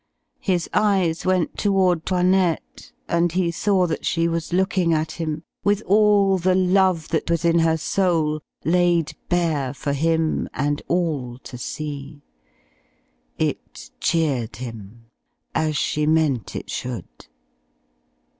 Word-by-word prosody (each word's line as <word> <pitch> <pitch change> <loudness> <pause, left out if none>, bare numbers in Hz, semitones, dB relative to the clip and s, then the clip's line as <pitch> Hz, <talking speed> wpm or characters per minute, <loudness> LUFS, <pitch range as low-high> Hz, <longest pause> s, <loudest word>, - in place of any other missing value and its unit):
His 180 -4 0
eyes 190 -5 +1
went 185 -3 0
toward 190 -5 +2
'Toinette, 180 -2 0 0.2
and 170 0 +1
he 180 -2 +1
saw 190 +1 +2
that 165 -2 -3
she 165 0 +1
was 165 0 -3
looking 185 -2 +2
at 155 0 -1
him, 155 -1 -4 0.2
with 205 +1 +1
all 200 -1 +4
the 185 +1 +2
love 185 -3 +2
that 160 - -1
was 170 0 0
in 170 0 +4
her 165 0 +3
soul 160 -3 0 0.2
laid 175 -2 +2
bare 155 -7 0
for 140 +1 -2
him 160 +2 0
and 145 +1 -1
all 150 -9 -1
to 130 - -9
see. 145 +2 -6 1.1
It - - -4
cheered 135 -10 0
him, 115 -1 -9 0.5
as 155 -1 0
she 150 0 0
meant 155 -7 +1
it - - -6
should. 125 -2 -6
165 Hz, 125 wpm, -22 LUFS, 150-185 Hz, 1.1 s, all